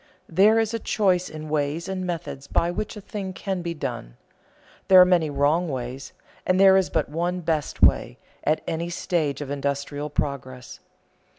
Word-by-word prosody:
There 200 +6 +4
is 225 0 +1
a 230 - -1
choice 185 -6 +1
in 155 0 -8
ways 150 +3 -1
and 190 -1 -3
methods 150 -5 -5
by 170 - +1
which 210 +3 -4
a - - -8
thing 195 -1 -6
can 190 -1 -3
be 170 -1 -4
done. - - -6 0.7
There 190 -1 +8
are 180 - +9
many 175 -4 +2
wrong 145 +5 +1
ways, 130 0 -5 0.3
there 190 +1 +5
is 190 -1 +2
but 160 -3 0
one 175 +4 -2
best 160 -3 -2
way, - - +3 0.3
at 155 +1 +1
any 170 +1 -3
stage 165 -4 -1
of 140 -1 -5
industrial 140 +1 -3
progress. 130 -3 -4
165 Hz, 170 wpm, -24 LUFS, 145-185 Hz, 0.7 s, are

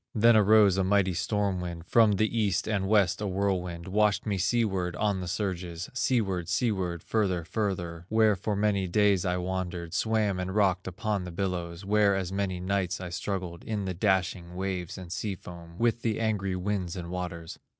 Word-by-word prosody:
"Then 115 +1 +6
arose 105 -2 +5
a - - +3
mighty 95 -1 +2
storm 100 0 -1
wind, 85 -2 -6
From 110 +2 +5
the 110 +3 0
East 105 -4 +1
and 100 -3 0
West 100 -2 +3
a 105 - -1
whirlwind, 90 -3 -2
Washed 105 +1 +2
me 100 -3 -1
seaward 95 -3 0
on 100 -3 0
the 90 - -5
surges, 90 -2 -3
Seaward, 95 -9 0
seaward, 90 -5 -1
further, 95 -6 0
further, 90 -3 -3
Where 110 -1 +4
for 100 +3 -2
many 100 -2 +1
days 100 0 +3
I 90 0 +1
wandered, 90 -2 -3
Swam 110 -3 +1
and 95 +1 -3
rocked 95 -3 +2
upon 100 +1 -2
the 90 - -6
billows, 85 -1 -3
Where 100 -1 +3
as 95 -2 -2
many 95 -2 -2
nights 95 -1 -1
I 90 -1 -5
struggled, 90 -1 -4
In 105 -3 -3
the 95 - -2
dashing 90 -2 0
waves 95 -2 -3
and 90 -2 -9
sea 100 +1 -2
foam, 85 -1 -11
With 120 +1 +1
the 110 -2 -1
angry 100 -4 0
winds 90 -1 -2
and 85 -2 -6
waters. 90 -2 -5
95 Hz, 180 wpm, -28 LUFS, 90-105 Hz, -, Then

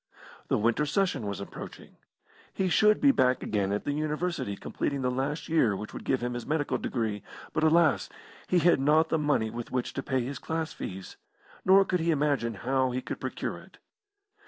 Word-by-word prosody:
The - - +2
winter 120 +7 +1
session 150 - 0
was 100 -1 -4
approaching. 100 - -9 0.5
He 190 -1 -1
should 210 +4 +4
be 280 - +6
back 130 - +2
again 100 -2 0
at 105 - -1
the - - 0
University 155 - -2
completing 140 +6 -3
the 125 - +1
last 140 +4 -2
year 130 -11 +3
which 105 +2 -7
would - - -8
give 130 - +1
him 125 0 -1
his 120 -1 -4
medical 150 -1 -1
degree; 110 -4 -2 0.3
but, 155 - 0
alas! 160 0 +4 0.4
he 180 - +2
had 175 -3 +4
not 155 +4 +3
the 160 - +1
money 145 -7 +1
with 120 0 -6
which 125 -1 -2
to 135 - -3
pay 130 -1 0
his 135 +2 -5
class 160 0 -3
fees, 95 0 -7 0.5
nor 195 +1 +6
could 180 -1 0
he 165 +1 0
imagine 145 -7 +1
how 130 +4 0
he 125 +1 -2
could - - -5
procure - - -4
it. - - -17
140 Hz, 195 wpm, -28 LUFS, 120-160 Hz, 0.5 s, be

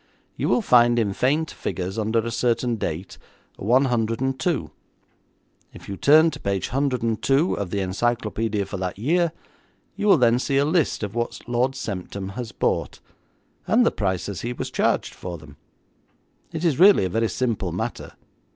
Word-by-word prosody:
You - - -1
will 240 - +2
find 120 -5 +5
in 105 -4 +1
faint 150 +9 0
figures 95 +3 -4
under 110 +1 0
a 115 - -3
certain 120 0 0
date, 90 -1 -5 0.4
102. 130 - 0 1.0
If - - -12
you 100 - -5
turn 155 - +5
to - - -8
page 100 -2 -2
102 135 - +1
of 100 -3 -3
the 100 +2 -2
encyclopaedia 110 +1 -1
for 100 - -6
that 90 0 -4
year, 165 - +1 0.6
you 210 +1 -2
will 195 - +7
then 120 -2 +3
see 135 +1 0
a 140 - +3
list 155 -6 +1
of 105 -1 -4
what 120 0 -3
Lord 125 +2 +1
Semptam 100 -6 -5
has 115 +3 -6
bought, - - -1 0.7
and 240 +2 +4
the - - +3
prices 95 -1 -2
he 120 +1 -3
was - - -5
charged - - 0
for 90 -1 -7
them. 75 -2 -14 1.0
It 165 +1 -3
is 155 -4 +1
really 190 - +7
a - - +1
very 115 +4 0
simple 115 +2 -1
matter. - - -5
120 Hz, 160 wpm, -23 LUFS, 100-135 Hz, 1.0 s, will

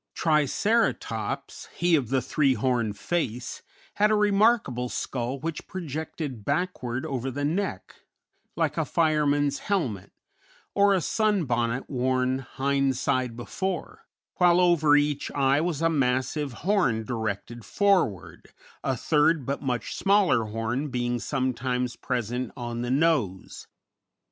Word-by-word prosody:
Triceratops, 155 - 0
he 175 -1 +3
of 135 -7 0
the 130 -2 +1
three 135 0 +2
horned 115 -3 0
face, 125 -8 -3 0.4
had 210 +1 +4
a 215 - +3
remarkable 205 - +2
skull 125 +2 -3
which 160 +2 -5
projected 155 - -5
backward 140 - -2
over 135 -4 -3
the 145 +2 -3
neck, 165 - -3 0.6
like - - 0
a - - +2
fireman's 150 -3 +1
helmet, 130 - -2 0.6
or 200 0 +4
a 185 - +1
sunbonnet 135 - 0
worn 130 0 0
hind 135 0 0
side 125 -3 0
before, 185 +8 -4 0.3
while 175 -1 +5
over 165 -4 +4
each 145 -1 +1
eye 140 +1 +3
was 165 -2 -2
a - - +5
massive 135 +1 0
horn 175 - +2
directed 110 0 -4
forward, 110 - 0 0.3
a 130 -2 0
third, 150 +1 +2
but 140 +2 -2
much 125 -4 -2
smaller 195 - +3
horn 115 +6 -2
being 120 -2 -1
sometimes 125 -1 -1
present 125 0 -3
on 120 -1 -4
the 120 - -3
nose. 130 - 0
135 Hz, 125 wpm, -26 LUFS, 120-165 Hz, 0.6 s, while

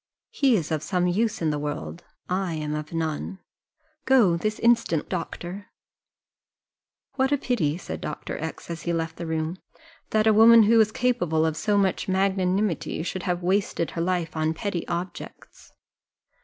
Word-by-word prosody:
He 270 -4 +3
is 165 -5 -2
of 155 -2 0
some 180 +1 0
use 205 +2 0
in 155 - +2
the 150 - -2
world 150 +3 -5 0.2
I 180 -2 -1
am 150 -1 -3
of 150 0 -5
none 165 +3 -3 0.7
go 240 -10 +5
this 215 +5 -2
instant, 230 -9 +2
doctor." 180 +2 -5 1.5
"What 265 +1 +2
a 285 - +3
pity," 175 - 0
said - - -7
Dr. - - -5
X, - - -6
as 165 -2 -5
he 170 - -2
left 165 -1 -3
the 170 - -5
room, 160 +2 -2 0.5
"that 215 0 +2
a 220 - +5
woman 225 +1 +8
who 225 +2 +5
is 215 0 +2
capable 175 -11 +1
of 160 -1 0
so 205 +4 +1
much 195 -2 +1
magnanimity 190 -2 0
should 185 +1 -4
have 175 0 -1
wasted 185 -2 0
her 165 - -3
life 175 -1 -1
on 160 0 0
petty 185 -2 -3
objects!" 175 +1 -7
180 Hz, 165 wpm, -25 LUFS, 160-210 Hz, 1.5 s, woman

